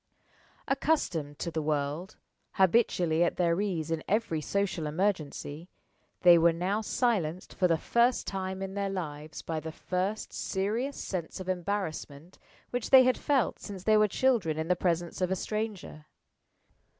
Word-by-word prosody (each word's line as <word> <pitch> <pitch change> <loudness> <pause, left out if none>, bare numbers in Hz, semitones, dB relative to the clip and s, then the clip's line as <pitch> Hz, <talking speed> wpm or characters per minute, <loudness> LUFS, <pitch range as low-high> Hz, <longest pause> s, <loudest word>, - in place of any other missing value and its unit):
Accustomed 180 - 0
to 170 - -4
the 160 - -2
world, 150 +3 -2 0.4
habitually 180 -4 +3
at 170 - +1
their 170 +1 +1
ease 170 -6 -2
in 160 -1 -1
every 205 -7 0
social 185 -2 -1
emergency, 160 -2 -2 0.5
they 175 -1 +8
were 170 +1 +5
now 185 +6 -1
silenced 195 -7 -1
for 180 - +2
the 165 -2 +2
first 235 +8 +2
time 190 0 -3
in 190 0 -5
their 200 0 -1
lives 155 -5 -5
by 160 -1 -3
the 160 +1 -6
first 185 +6 -3
serious 220 +8 -2
sense 180 -1 -4
of 185 - -7
embarrassment 175 -4 -4 0.3
which 245 -2 -2
they 265 -1 +9
had 255 0 +3
felt 280 -4 0
since 195 -3 -8
they 215 +1 +4
were 215 0 +5
children 210 -9 +1
in 160 +2 -3
the 180 - +4
presence 175 0 -1
of 180 - +1
a 190 - +1
stranger. 205 -7 -4
185 Hz, 155 wpm, -29 LUFS, 160-205 Hz, 0.5 s, they